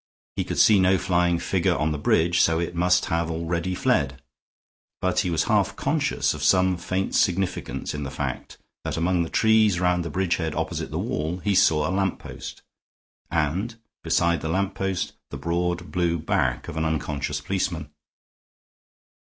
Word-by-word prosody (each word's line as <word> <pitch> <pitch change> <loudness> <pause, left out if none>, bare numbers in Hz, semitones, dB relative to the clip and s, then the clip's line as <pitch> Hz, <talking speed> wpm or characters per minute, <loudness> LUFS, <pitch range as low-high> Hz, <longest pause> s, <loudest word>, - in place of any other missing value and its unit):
He - - 0
could - - -4
see 105 -3 +6
no 95 +1 +4
flying 90 -1 +1
figure - - 0
on 75 +1 0
the 75 - -3
bridge, 85 +4 +3
so 80 0 +3
it 85 0 -2
must 90 +1 +2
have 85 0 -1
already 85 +2 -2
fled; 70 -5 +1 0.8
but 95 0 +1
he 95 - 0
was 80 -2 +1
half - - +1
conscious - - 0
of 75 - -7
some 90 +4 +4
faint 95 +2 -2
significance 90 -8 0
in 75 - -4
the 70 - -4
fact 65 - -5 0.3
that - - -3
among 85 +1 +1
the 85 - -2
trees 110 -4 +3
round 90 -1 +1
the 85 - -4
bridgehead 85 -2 -1
opposite - - -3
the - - -4
wall 80 +4 -2
he 100 +2 -1
saw 80 -5 +4
a - - -2
lamp 95 0 0
post; - - -9 0.7
and, 85 +9 -1 0.3
beside 85 0 +2
the 80 - -3
lamp 95 +3 0
post, 95 -2 -2 0.2
the - - -6
broad 90 +1 -2
blue 85 -2 +1
back 80 - -1
of 80 - -6
an 80 - 0
unconscious 75 -3 -2
policeman. 85 -6 -3
85 Hz, 170 wpm, -24 LUFS, 80-95 Hz, 0.8 s, see